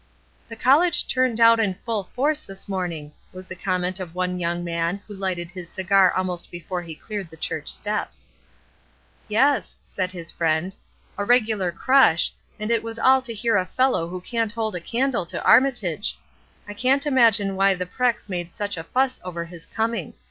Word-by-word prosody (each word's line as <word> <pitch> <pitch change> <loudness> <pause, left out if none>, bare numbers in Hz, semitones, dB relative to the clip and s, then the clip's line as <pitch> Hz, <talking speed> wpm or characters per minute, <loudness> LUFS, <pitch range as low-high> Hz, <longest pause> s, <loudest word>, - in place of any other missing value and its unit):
''The 230 -1 -9
college 330 +7 +4
turned 255 -3 +1
out 230 0 +7
in 200 -4 +1
full 215 -1 -3
force 295 +8 0
this 195 0 -10
morning," 175 -6 -4 0.2
was 185 0 -10
the 185 - -8
comment 185 0 -2
of 175 -2 -7
one 180 0 -1
young 175 0 -2
man 170 +2 -1
who 205 - -9
Ughted 180 -3 -3
his 180 -2 -8
cigar 190 -1 +3
almost 180 -2 -2
before 175 +1 -5
he 165 -2 -8
cleared 200 0 -6
the 160 - -14
church 155 -1 -3
steps. 210 0 -2 1.0
"Yes," 265 +7 +2
said 185 -1 -3
his 170 -2 -7
friend. 165 +3 0 0.4
"A - - 0
regular 215 -5 +2
crush, 255 -3 +4 0.3
and 215 +2 -2
it 230 -2 +2
was 230 0 -6
all 260 +2 +5
to 255 -2 -6
hear 225 0 +1
a 185 - +2
fellow 255 -8 +1
who 180 +1 -6
can't 230 +2 -2
hold 225 -2 -2
a - - -2
candle 240 -1 -1
to - - -5
Armitage. 225 - +3 0.5
I 205 - -6
can't 260 +6 +2
imagine 225 -8 +3
why 195 0 +3
the 180 0 -3
Prex 245 +5 -1
made 175 -3 -4
such 205 -3 -3
a 165 - -5
fuss 255 +8 0
over 170 -2 -5
his 170 -1 -12
coming. 225 -6 -2
195 Hz, 185 wpm, -23 LUFS, 180-230 Hz, 1.0 s, out